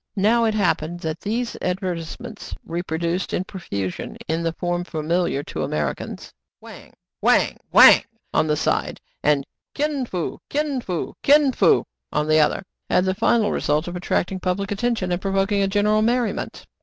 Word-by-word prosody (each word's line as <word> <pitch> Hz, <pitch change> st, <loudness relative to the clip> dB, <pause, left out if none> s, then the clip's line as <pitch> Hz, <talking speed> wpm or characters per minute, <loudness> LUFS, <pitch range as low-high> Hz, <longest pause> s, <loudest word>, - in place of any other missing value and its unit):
Now 230 Hz, +4 st, +3 dB
it 220 Hz, -1 st, +1 dB
happened 175 Hz, -4 st, 0 dB
that 160 Hz, 0 st, -3 dB
these 235 Hz, +3 st, -2 dB
advertise 180 Hz, -2 st, -3 dB
ments 240 Hz, -3 st, -8 dB
— -, -, -49 dB
reproduced 170 Hz, +1 st, -2 dB
in 180 Hz, -, -1 dB
profusion 100 Hz, -, -5 dB
in 160 Hz, +1 st, 0 dB
the 165 Hz, 0 st, 0 dB
form 175 Hz, +1 st, -2 dB
fa 175 Hz, -2 st, -8 dB
miliar 165 Hz, -3 st, 0 dB
to 80 Hz, -, -5 dB
Americans 75 Hz, 0 st, -3 dB, 0.3 s
(Wang! -, -, -13 dB, 0.3 s
Wang!! -, -, +3 dB
Wang!!! -, -, +9 dB, 0.3 s
on -, -, +2 dB
one 150 Hz, -, +2 dB
side, -, -, -1 dB, 0.2 s
and 145 Hz, -2 st, +2 dB, 0.3 s
Kin 290 Hz, -3 st, -1 dB
Fo! 180 Hz, -6 st, -4 dB
Kin 290 Hz, -3 st, -1 dB
Fo!! 180 Hz, -7 st, -4 dB
Kin 290 Hz, -1 st, +5 dB
Fo!!! -, -, +3 dB, 0.3 s
on 150 Hz, 0 st, 0 dB
the 155 Hz, 0 st, +4 dB
other) 150 Hz, +5 st, +2 dB
— -, -, -56 dB
had 180 Hz, -, +3 dB
the 190 Hz, -, +1 dB
final 220 Hz, +1 st, +2 dB
result 150 Hz, +3 st, 0 dB
of 175 Hz, -, -5 dB
attracting 180 Hz, +1 st, -1 dB
public 190 Hz, +2 st, -2 dB
attention, 205 Hz, -3 st, -1 dB
and 175 Hz, +1 st, -1 dB
provoking 195 Hz, 0 st, +1 dB
general 210 Hz, +2 st, +2 dB
merri 235 Hz, 0 st, +2 dB
ment. -, -, -7 dB
185 Hz, 170 wpm, -22 LUFS, 165-215 Hz, 0.3 s, Wang